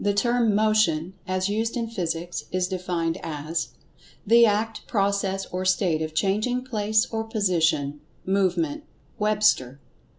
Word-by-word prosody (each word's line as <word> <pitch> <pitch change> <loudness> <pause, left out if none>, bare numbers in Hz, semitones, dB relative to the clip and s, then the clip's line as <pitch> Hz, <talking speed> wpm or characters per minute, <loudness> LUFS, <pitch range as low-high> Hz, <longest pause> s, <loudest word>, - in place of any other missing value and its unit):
The 205 -1 +1
term 235 -1 +2
"Motion," 205 -6 +2
as 185 0 0
used 225 +4 -1
in 230 -1 -2
Physics, 175 -5 -4
is 185 0 0
defined 175 -3 -2
as: 155 +2 -3 0.6
"The 235 +2 +6
act, 215 +1 -1
process 195 -2 0
or 185 +1 -2
state 185 -4 +1
of 155 0 -4
changing 215 +8 0
place 215 -3 +1
or 225 -1 -1
position; 170 -9 0 0.3
movement"—(Webster). 185 - 0
195 Hz, 125 wpm, -25 LUFS, 170-215 Hz, 0.6 s, The